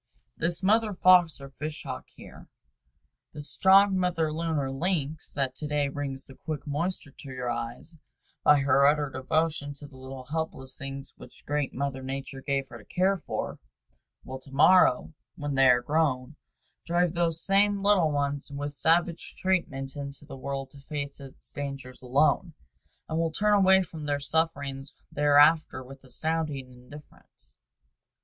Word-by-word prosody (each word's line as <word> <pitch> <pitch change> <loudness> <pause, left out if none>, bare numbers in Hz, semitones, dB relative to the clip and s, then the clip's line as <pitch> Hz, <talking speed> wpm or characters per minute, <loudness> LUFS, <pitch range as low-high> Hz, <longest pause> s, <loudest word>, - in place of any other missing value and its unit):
This 170 +3 -1
mother 215 +1 +3
fox 180 -4 +5
or 135 0 -10
fish 155 +2 -5
hawk 130 -2 -6
here, - - -13 0.9
this 145 0 -5
strong 195 +1 +5
mother 165 -4 0
loon 165 0 -1
or 135 -2 -1
lynx 155 0 -2
that 135 -2 -1
to 150 - -4
day 145 -1 0
brings 140 -1 -5
the 135 - -13
quick 150 +2 -6
moisture 150 +1 -3
to 140 - -10
your 125 -1 -3
eyes 120 +7 -5 0.5
by 145 -1 +6
her 140 +1 +4
utter 145 -1 +2
devotion 150 +2 -1
to 145 - -11
the 140 -2 -14
little 130 0 -8
helpless 140 -3 -4
things 135 0 -7
which - - -14
great 145 -2 -1
Mother 135 0 -2
Nature 135 0 -6
gave 135 -1 -1
her 120 - -10
to - - -16
care 190 +2 +1
for, - - -3 0.6
will 130 0 -7
to 135 +1 -12
morrow, 155 0 +5 0.2
when 145 -1 -4
they 135 -1 +5
are 125 0 +4
grown, 145 -2 0 0.5
drive 175 0 +1
those 170 -2 0
same 200 0 +3
little 200 -6 +4
ones 145 0 -2
with 145 0 -5
savage 165 +3 +1
treatment 135 -8 -1
into 140 0 -7
the 135 - -9
world 135 0 -5
to 140 - -14
face 140 0 -5
its 135 -1 -12
dangers 135 -3 -6
alone, 145 +6 +2 0.5
and 160 0 -2
will 165 -1 +1
turn 210 +6 +2
away 190 -1 +5
from 155 -3 -8
their 145 -1 0
sufferings 140 -2 -2 0.2
thereafter 145 -1 +4
with 135 +1 -13
astounding 150 -1 -3
indifference. 125 - -15
145 Hz, 160 wpm, -28 LUFS, 135-165 Hz, 0.9 s, by